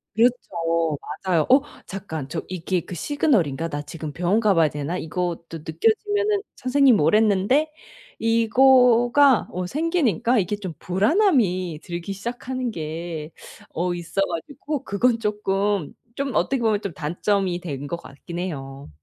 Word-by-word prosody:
그렇죠. 165 - +1 0.3
맞아요. 175 -5 +2
'어 265 +2 +7 0.2
잠깐. 160 -8 -6
저 165 - -3
이게 180 0 -2
그 180 - -8
시그널인가? 170 - +1
나 145 -1 -3
지금 155 0 -7
병원 180 +7 +1
가 215 -3 +3
봐야 165 -3 +4
되나? 150 +5 -3
이것도 170 -1 -4
느껴지면은 405 - +1
선생님이 255 -2 +4
오랬는데.' 215 - +3 0.5
이거가 245 +2 +5
어 180 0 -3
생기니까 260 - +1
이게 195 +2 -1
좀 190 -5 -6
불안함이 190 - +2
들기 170 +2 -5
시작하는 245 +4 -4
게 160 -2 -5 0.4
어 175 +1 -1
있어 175 +3 -3
가지고 270 - -3
그건 230 +2 +1
쪼끔 205 -4 -1 0.2
좀 275 -4 -3
어떻게 245 +8 +1
보면 220 -3 +2 0.2
단점이 175 +3 -1
된 145 -5 -5
것 155 - -3
같긴 170 +2 -9
해요. 140 -6 -6
195 Hz, 285 characters per minute, -23 LUFS, 165-245 Hz, 0.5 s, 어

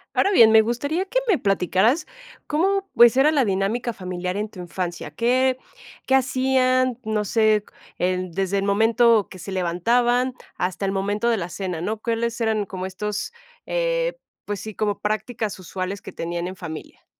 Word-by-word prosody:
Ahora 400 - +3
bien, 230 - +7
me 220 - +8
gustaría 285 - -1
que 450 +6 0
me 405 -7 +4
platicaras 200 - +2 0.4
cómo, 390 +6 +1
pues, 240 +2 +7
era 290 +3 +5
la 280 - +3
dinámica 205 +4 0
familiar 180 -2 -4
en 210 +1 -2
tu 190 -4 -10
infancia, 175 -1 -5
qué 255 +2 +2 0.5
qué 265 - +4
hacían, 255 -1 +2
no 215 -1 -1
sé, 215 -1 +2 0.3
en 185 0 -1
desde 195 +2 -1
el - - -2
momento 225 +2 +3
que 185 - -11
se 185 +3 -7
levantaban 240 +8 +1 0.2
hasta 185 +2 -2
el 195 - -1
momento 205 +4 0
de 230 - +3
la 180 -4 -4
cena, 180 -3 -4
¿no? 215 +5 -2
¿Cuáles 230 0 -1
eran 220 -2 0
como 185 -1 -6
estos, 210 - -4 0.3
eh, - - -1 0.3
pues 205 -1 -4
sí, 220 - -7
como 205 0 -1
prácticas 215 0 -3
usuales 185 +2 -5
que - - -10
tenían 170 +1 -3
en 185 - -6
familia? 160 -4 -9
215 Hz, 170 wpm, -23 LUFS, 190-250 Hz, 0.5 s, me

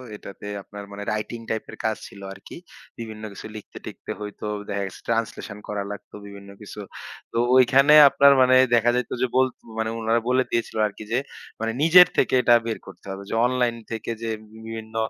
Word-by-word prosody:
এটাতে 100 -1 -11 0.2
আপনার 105 +1 -10
মানে 100 0 -7
রাইটিং 110 +2 -4
টাইপের 110 - -4
কাজ 110 -1 +1
ছিল 100 - -14
আরকি। 95 - -12 0.4
বিভিন্ন 110 -2 -7
কিছু - - -10
লিখতে-টিখতে 105 - -9
হয়তো 105 0 -7 0.2
দেখা 100 0 -2
গেছে, 95 - -11
ট্রান্সলেশন 115 -2 -2
করা 105 -1 -3
লাগতো 100 - -10
বিভিন্ন 100 0 -12
কিছু। 105 0 -10 0.5
তো - - -4 0.2
ঐখানে 135 +3 +6 0.2
আপনার 140 +1 +6
মানে 130 0 +5 0.2
দেখা 120 0 +3
যাইত 125 -1 -2
যে, 130 - +2
বলত 130 -1 +3 0.2
মানে 110 0 -1
উনারা 115 +1 +1
বলে 130 +1 +3
দিয়েছিল 115 -1 -2
আরকি, 105 +1 -10
যে 120 - +2 0.4
মানে 115 +1 -1
নিজের 175 +3 +8
থেকে - - +2
এটা 120 -1 +5
বের 115 - -2
করতে - - -13
হবে। 95 +1 -7
যে - - -2
অনলাইন 125 -1 +1 0.2
থেকে 115 0 -4
যে 115 - -2 0.4
বিভিন্ন 110 0 -8
115 Hz, 180 wpm, -24 LUFS, 105-125 Hz, 0.5 s, নিজের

